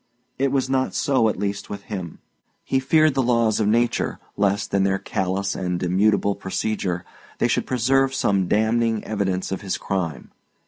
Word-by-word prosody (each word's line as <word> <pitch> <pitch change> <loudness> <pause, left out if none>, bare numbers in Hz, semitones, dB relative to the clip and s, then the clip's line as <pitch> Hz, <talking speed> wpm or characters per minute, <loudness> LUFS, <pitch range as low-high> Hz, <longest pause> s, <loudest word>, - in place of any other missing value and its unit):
It 135 0 +2
was 135 -2 +1
not 130 0 0
so, 130 -5 +2
at - - -3
least, 100 0 -3
with 100 - -6
him. 95 -6 -6 0.5
He 135 - +1
feared 155 +3 +3
the 135 - +1
laws 115 -3 +2
of 105 - +1
nature, 120 +3 +1 0.2
lest, 100 0 0
in 100 -1 +3
their 95 0 +2
callous 95 +1 -2
and 90 -1 -2
immutable 100 +3 +2
procedure, 95 -2 -2 0.3
they - - +2
should - - 0
preserve 130 +2 +2
some 100 -7 +1
damning 110 +1 +1
evidence 95 -4 -2
of 95 - -3
his 95 -3 -2
crime. 85 -7 -3
105 Hz, 170 wpm, -23 LUFS, 95-120 Hz, 0.5 s, feared